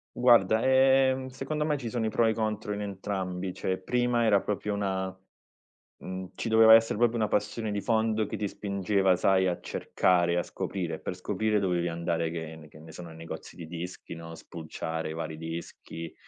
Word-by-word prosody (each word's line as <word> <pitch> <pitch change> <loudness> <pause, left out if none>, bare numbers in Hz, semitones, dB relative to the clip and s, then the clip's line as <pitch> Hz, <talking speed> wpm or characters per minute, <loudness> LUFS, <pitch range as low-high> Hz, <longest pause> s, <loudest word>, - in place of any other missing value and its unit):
Guarda, 115 -3 +5
ehm, 130 0 +4
secondo 135 +4 -3
me 150 -1 0
ci 120 -4 -5
sono 115 -1 -1
i 110 - +1
pro 115 +2 +2
e 110 - +4
i - - 0
contro 110 -1 -2
in 105 - -4
entrambi. 95 -2 -4
Cioè 95 +1 -2
prima 120 +2 +1
era 100 -3 +4
proprio 105 0 -2
una, 95 -2 -2 0.8
mhmm, 95 0 -7
ci 115 - -3
doveva 110 0 +8
essere 115 -2 +5
proprio 120 0 +3
una 110 -2 0
passione 105 +1 -1
di 105 - -1
fondo 110 0 +1
che 105 - -5
ti 105 -1 -2
spingeva 100 -1 +1
sai 95 +1 +3
a 90 - 0
cercare 85 -1 +1
e 85 - +1
a 90 - +1
scoprire 85 -5 -4
e - - -10
per - - -5
scoprire 105 +3 0
dovevi 90 -2 0
andare 85 -1 -1
che 80 -1 -6
ne 80 -1 -13
che 75 - -16
ne 80 +1 -12
sono 85 0 -9
negozi 80 +1 -9
di 85 - -8
dischi, 85 +2 -7
no, 85 0 -8
spulciare 80 0 -5
vari 80 -1 -5
dischi 80 0 -7
100 Hz, 195 wpm, -28 LUFS, 85-110 Hz, 0.8 s, doveva